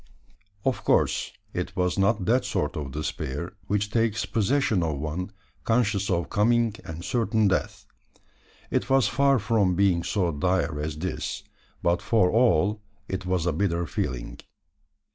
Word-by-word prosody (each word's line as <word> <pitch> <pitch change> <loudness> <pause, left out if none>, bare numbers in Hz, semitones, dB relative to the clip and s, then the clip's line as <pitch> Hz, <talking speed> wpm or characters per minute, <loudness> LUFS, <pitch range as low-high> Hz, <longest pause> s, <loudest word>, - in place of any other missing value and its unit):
Of 130 -2 0
course, - - +2 0.2
it 90 +1 -4
was 90 +1 0
not 100 0 +2
that 125 +5 +3
sort 75 +2 -2
of 75 -4 -4
despair 75 +2 -4
which 105 0 0
takes 115 -1 +1
possession 115 -2 +1
of 80 -3 -1
one 80 +6 -3 0.3
conscious 110 -4 +1
of 85 -3 0
coming 115 +2 +2
and 80 +2 -7
certain 110 -3 +1
death. 95 - -1 0.9
It - - 0
was 135 -1 +4
far 140 -1 +3
from 100 -4 +2
being 95 -3 +3
so 90 -1 0
dire 90 0 0
as 75 +1 -3
this; 90 +4 -4 0.4
but 85 +1 +2
for 100 -6 +3
all 105 -3 +3 0.3
it 95 -1 -4
was 90 -2 0
a 90 - +1
bitter 85 -4 0
feeling. 65 -6 -4
95 Hz, 145 wpm, -26 LUFS, 85-110 Hz, 0.9 s, was